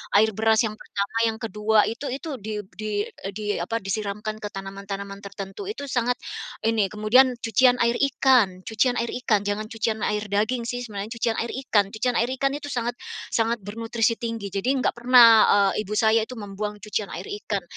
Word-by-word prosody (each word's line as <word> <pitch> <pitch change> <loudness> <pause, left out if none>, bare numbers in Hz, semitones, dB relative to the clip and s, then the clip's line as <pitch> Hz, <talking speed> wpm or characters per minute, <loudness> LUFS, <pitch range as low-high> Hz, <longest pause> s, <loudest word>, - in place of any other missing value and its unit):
air 220 +2 +5
beras 220 +1 +3
yang 215 - -7
pertama 200 +1 -4
yang 220 0 -2
kedua 215 0 +1
itu 230 +6 -4
itu, 275 +5 -5
di 210 +1 -4 0.2
di 215 +3 -5 0.4
di 210 +2 -6 0.2
apa, 225 +6 -2
disiramkan 210 +2 -3
ke 210 - -3
tanaman-tanaman 195 0 -6
tertentu 200 - -7
itu 285 -10 -5
sangat 245 -1 0 0.5
ini 220 -3 +2
kemudian 240 +5 +4
cucian 245 +3 +4
air 235 0 +3
ikan 255 -9 +3
cucian 245 +3 +1
air 235 - -1
ikan, 210 -5 +3
jangan 205 +1 -1
cucian 225 -1 -2
air 210 0 -1
daging 215 +5 0
sih 245 +1 -3
sebenarnya 210 -1 -6
cucian 225 -1 0
air 235 - -3 0.2
ikan. 205 -2 +3
Cucian 240 +3 0
air 235 - +2
ikan 275 0 +2
itu 290 0 -6
sangat 240 -1 -2 0.4
sangat 230 +1 +1
bernutrisi 225 +2 -1
tinggi 230 -3 -4
jadi 195 +5 -1
enggak 255 - 0
pernah, 245 0 +8 0.5
eee, - - -1
ibu 205 - -5
saya 220 0 +3
itu 255 - -9
membuang 210 0 -5
cucian 210 -1 -3
air 185 - -6 0.2
ikan. 200 -3 -1
220 Hz, 180 wpm, -24 LUFS, 205-235 Hz, 0.5 s, pernah